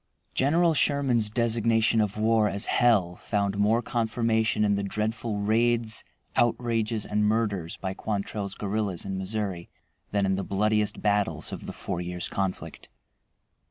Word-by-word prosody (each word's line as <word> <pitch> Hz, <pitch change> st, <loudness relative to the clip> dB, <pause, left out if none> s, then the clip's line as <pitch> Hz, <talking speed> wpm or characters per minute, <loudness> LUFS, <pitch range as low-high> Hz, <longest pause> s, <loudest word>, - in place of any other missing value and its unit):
General 165 Hz, +5 st, +3 dB
Sherman's 135 Hz, -7 st, +2 dB
designation 115 Hz, 0 st, +2 dB
of 105 Hz, 0 st, -2 dB
war 110 Hz, 0 st, +3 dB
as 100 Hz, +1 st, 0 dB
"hell" 100 Hz, -8 st, +2 dB
found 100 Hz, -1 st, -1 dB
more 110 Hz, +4 st, +3 dB
confirmation 110 Hz, -2 st, +1 dB
in 100 Hz, -, +2 dB
the 100 Hz, -, 0 dB
dreadful 105 Hz, +2 st, -2 dB
raids, 115 Hz, +1 st, +2 dB, 0.3 s
outrages, 115 Hz, -2 st, +1 dB
and 105 Hz, 0 st, 0 dB
murders 105 Hz, -6 st, 0 dB
by 95 Hz, -1 st, -4 dB
Quantrell's 100 Hz, -1 st, -3 dB
guerrillas 100 Hz, -3 st, -2 dB
in 95 Hz, -1 st, -3 dB
Missouri 95 Hz, -3 st, -3 dB, 0.4 s
than 100 Hz, -1 st, +1 dB
in 95 Hz, 0 st, +1 dB
the 100 Hz, -, -2 dB
bloodiest 105 Hz, +2 st, 0 dB
battles 100 Hz, -7 st, 0 dB
of -, -, -7 dB
the -, -, -4 dB
four 85 Hz, -, -4 dB
years' 90 Hz, 0 st, -3 dB
conflict. 95 Hz, -1 st, -4 dB
105 Hz, 140 wpm, -27 LUFS, 100-115 Hz, 0.4 s, General